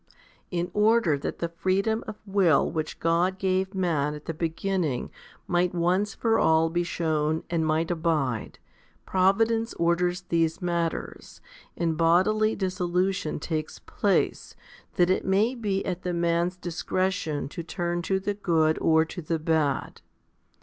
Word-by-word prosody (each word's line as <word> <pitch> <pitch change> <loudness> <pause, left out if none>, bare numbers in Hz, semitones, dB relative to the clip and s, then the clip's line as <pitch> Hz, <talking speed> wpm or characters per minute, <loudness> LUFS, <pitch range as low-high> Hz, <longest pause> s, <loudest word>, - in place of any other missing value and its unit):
40. 180 - -4
In 175 +1 -3
order 210 -6 +3
that 140 - -4
the 170 - -2
freedom 195 +6 0
of 215 - -5
will 195 -6 +3
which 155 -2 -4
God 170 +3 +1
gave 190 +1 0
man 155 -6 0
at 150 - -11
the 165 - -3
beginning 165 -3 -2 0.3
might 175 0 +1
once 185 +4 +1
for 225 -1 +1
all 160 0 +3
be 175 +1 +1
shewn 160 -2 -1
and 160 -2 +1
might 160 +2 +1
abide, 155 -9 -1 0.5
providence 225 +5 +2
orders 175 +2 +1
these 165 -1 +1
matters, 170 -2 -3 0.4
and 165 -2 0
bodily 205 +6 +3
dissolution 185 -2 -1
takes 155 0 -4
place, - - -1 0.4
that 175 0 +3
it - - +1
may 205 +6 +2
be 205 -6 -2
at 180 -1 -3
the 180 -1 -2
man's 170 +1 0
discretion 180 -3 -2
to 170 - -6
turn 175 0 -3
to 190 +3 0
the 205 +1 -2
good 160 -6 +1
or 160 0 +4
to 175 +2 -7
the 165 +1 -1
bad. 155 -3 -1
175 Hz, 145 wpm, -26 LUFS, 160-190 Hz, 0.5 s, or